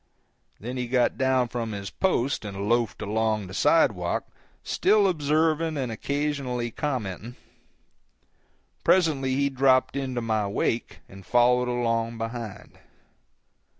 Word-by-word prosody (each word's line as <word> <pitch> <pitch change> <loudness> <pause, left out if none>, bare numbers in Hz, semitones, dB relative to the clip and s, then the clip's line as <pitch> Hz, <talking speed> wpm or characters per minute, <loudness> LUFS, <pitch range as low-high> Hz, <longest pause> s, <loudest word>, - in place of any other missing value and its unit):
Then 125 +4 -5
he 125 -1 -2
got 125 0 +2
down 130 -1 +2
from 115 -2 -3
his 100 -1 -6
post 140 -11 0
and 100 -1 -5
loafed 115 -1 0
along 110 0 0
the 95 - -10
sidewalk, 105 - +2 0.4
still 205 0 +3
observing 160 -1 +1
and 130 -4 -2
occasionally 135 -2 -2
commenting. 120 -4 -4 1.5
Presently 145 -8 +2
he 140 0 +1
dropped 130 0 +3
into 130 -3 -2
my 110 -3 0
wake 115 +3 -2
and 95 0 -13
followed 125 +3 +3
along 115 -1 -1
behind. 115 -3 -7
125 Hz, 115 wpm, -26 LUFS, 110-140 Hz, 1.5 s, still